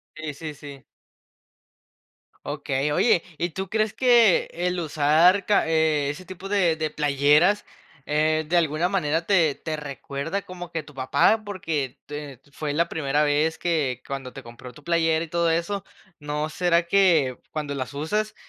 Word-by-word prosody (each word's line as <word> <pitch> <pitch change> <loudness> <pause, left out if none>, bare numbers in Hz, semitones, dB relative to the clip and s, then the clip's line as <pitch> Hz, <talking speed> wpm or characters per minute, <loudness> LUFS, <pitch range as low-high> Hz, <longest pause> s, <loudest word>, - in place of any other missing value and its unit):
Sí, 155 -1 -6
sí, 150 +1 -7
sí. 140 -1 -11 1.6
Okey, 135 +2 -2
oye, 175 +1 +3
¿y 175 0 -2
tú 190 +3 -5
crees 215 0 0
que 240 -6 +4
el 180 +1 -2
usar 160 +5 +3
ca 205 - +3
eh, 160 -3 +1
ese 180 +6 -6
tipo 185 +2 -9
de 185 -5 +2
de 155 -1 -2
playeras, 150 +7 +3 0.4
eh, 155 +1 +1
de 175 - +3
alguna 165 +1 +1
manera 165 -4 0
te 170 -8 +3
te 155 -1 -5
recuerda 145 +5 -5
como 175 -2 -9
que 165 -2 -4
tu 150 - -15
papá? 140 +11 +2
Porque, 160 -9 -3
te 145 -3 -8
fue 145 +1 -4
la 170 +2 +1
primera 145 -1 0
vez 150 +2 +1
que 155 -7 -1
cuando 135 -2 -6
te - - -9
compró 120 +1 -11
tu 150 - -16
playera 165 0 +1
y 165 - -9
todo 170 0 +1
eso, 185 +4 -2 0.3
¿no 150 +1 -3
será 175 0 +2
que 170 -9 +3
cuando 150 -2 -4
las 130 0 -5
usas 210 +9 -2
160 Hz, 160 wpm, -24 LUFS, 145-175 Hz, 1.6 s, que